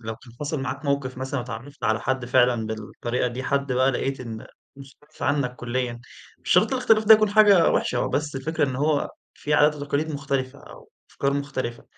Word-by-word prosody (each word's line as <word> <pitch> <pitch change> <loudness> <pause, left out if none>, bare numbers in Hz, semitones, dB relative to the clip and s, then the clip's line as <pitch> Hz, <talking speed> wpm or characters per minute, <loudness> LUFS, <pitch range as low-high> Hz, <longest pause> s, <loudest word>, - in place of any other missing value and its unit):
لو 115 -1 -6
كان 120 0 -17
حصل 150 -1 -2
معاك 135 +2 -5
موقف 140 -3 -1
مثلًا 135 +1 -3
واتعرفت 120 +6 -8
على 110 +1 +1
حد 130 +1 -1
فعلًا 120 -2 +2
بالطريقة 110 +3 -3
دي 125 +2 -6
حد 140 0 -1
بقى 130 +2 +3
لقيت 135 +1 -2
إن 115 -3 -7 0.3
مُستعصي 140 +1 -11
عنك 140 -4 0
كليًا، 120 -1 -3 0.4
مش - - -8
شرط - - +4
الاختلاف 235 -4 +3
ده 220 +1 +9
يكون 215 -1 +2
حاجة 205 -5 +6
وحشة - - 0
هو - - 0
بس 145 -1 -2
الفكرة 155 +4 -1
إن 130 - -4
هو 145 +1 0 0.2
في 150 - -2
عادات 150 +1 +4
وتقاليد 145 +2 -2
مختلفة 140 -1 -3
أو 145 - -15 0.2
أفكار 140 0 -1
مختلفة. 140 -4 -4
135 Hz, 190 wpm, -24 LUFS, 125-145 Hz, 0.4 s, ده